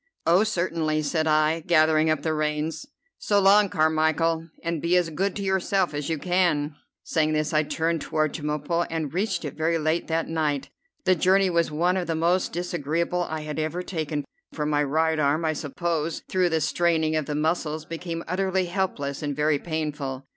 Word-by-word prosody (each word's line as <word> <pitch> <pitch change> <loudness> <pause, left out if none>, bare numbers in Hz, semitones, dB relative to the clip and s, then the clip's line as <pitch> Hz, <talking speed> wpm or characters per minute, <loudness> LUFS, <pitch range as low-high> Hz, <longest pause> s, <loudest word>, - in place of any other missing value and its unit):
"Oh, 175 +5 +5
certainly," 165 -6 0
said 155 +2 0
I, 155 +1 +3
gathering 155 -1 +3
up 155 -2 0
the 160 - 0
reins. 155 - -2 0.3
"So 205 -1 +2
long, 200 +1 +5
Carmichel, 160 0 +1
and 165 -2 -2
be 175 +2 +3
as 175 -2 +1
good 190 +5 -1
to 200 - -4
yourself 190 -3 +1
as 145 0 -3
you 160 - 0
can." 170 -3 +1 0.3
Saying 155 -1 +1
this 155 0 0
I 155 - +4
turned 160 +1 -1
toward 155 -1 0
Chemulpo, 150 +2 -1
and 160 -3 -3
reached 185 -2 -1
it 145 - -4
very 165 +1 0
late 160 +2 0
that 165 0 -1
night. 150 -4 -1 0.4
The 185 - +5
journey 190 +2 +3
was 170 -1 +2
one 175 +5 +1
of 180 -3 -2
the 165 - -1
most 175 +3 +1
disagreeable 170 +1 -1
I 160 0 -3
had 150 0 -5
ever 160 +3 -2
taken, 155 -5 -3 0.3
for 150 - -2
my 150 -1 +1
right 160 +2 +1
arm 150 +3 +1
I 155 - +1
suppose 160 +2 -3
through 185 -1 +2
the 160 -1 0
straining 160 0 +1
of 155 -3 -1
the 150 - -2
muscles 155 0 -1
became 165 0 -5
utterly 190 +1 0
helpless 175 -7 -2
and 145 -2 -2
very 150 0 +2
painful. 150 -5 -4
160 Hz, 185 wpm, -25 LUFS, 155-175 Hz, 0.4 s, Oh